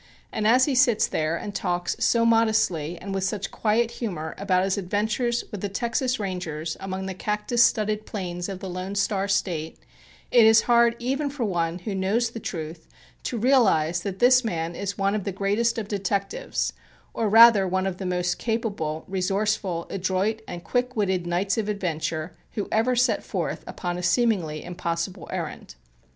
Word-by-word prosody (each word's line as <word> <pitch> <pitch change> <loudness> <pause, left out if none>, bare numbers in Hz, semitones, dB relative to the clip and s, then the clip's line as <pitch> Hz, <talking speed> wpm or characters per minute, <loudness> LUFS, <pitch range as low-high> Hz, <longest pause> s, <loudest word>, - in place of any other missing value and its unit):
And 215 -1 0
as 250 +3 +5
he 285 - 0
sits 245 -4 +4
there 155 +1 -1
and 205 +4 -5
talks 175 -2 -1
so 230 -1 +3
modestly 220 -8 +2
and 195 +1 -6
with 195 -1 -1
such 195 +1 -2
quiet 225 +2 +1
humor 175 -11 -4
about 185 -2 +2
his 195 0 +1
adventures 220 +5 -1
with 205 -4 -6
the 205 - -2
Texas 240 +4 -1
Rangers 170 -5 -4
among 190 0 -4
the 190 - -4
cactus 210 +5 +1
studded 215 -2 +1
plains 180 -2 -4
of 190 -1 -6
the 190 - -5
Lone 185 +2 -5
Star 200 -1 0
State, 170 -5 -1 0.5
it 240 - +7
is 220 0 +7
hard 235 -1 +4
even 270 +5 -1
for 275 -3 -4
one 170 -3 -1
who 190 +3 -5
knows 210 +5 0
the 230 - -6
truth, 160 -4 -6 0.3
to 240 - -3
realize 210 - +3
that 190 0 -4
this 250 +3 +5
man 170 -6 -2
is 200 +3 -4
one 195 0 +1
of 210 -2 -1
the 200 - -2
greatest 205 +5 0
of 220 -3 -3
detectives, 195 - -2 0.4
or 220 -2 0
rather 225 -2 +8
one 185 +1 0
of 190 -2 -2
the 190 - -4
most 180 -1 -1
capable, 200 -9 -2
resourceful, 190 -2 -1
adroit 195 +4 -1
and 175 -1 -7
quick 250 +7 -1
witted 190 -5 0
knights 190 +5 0
of 210 -1 -2
adventure 165 -4 -3 0.2
who 205 - -3
ever 230 +3 +2
set 250 +2 +2
forth - - -3
upon 175 -1 -4
a - - -4
seemingly 175 -6 +1
impossible 170 +1 -4
errand. - - -5
195 Hz, 175 wpm, -25 LUFS, 180-225 Hz, 0.5 s, rather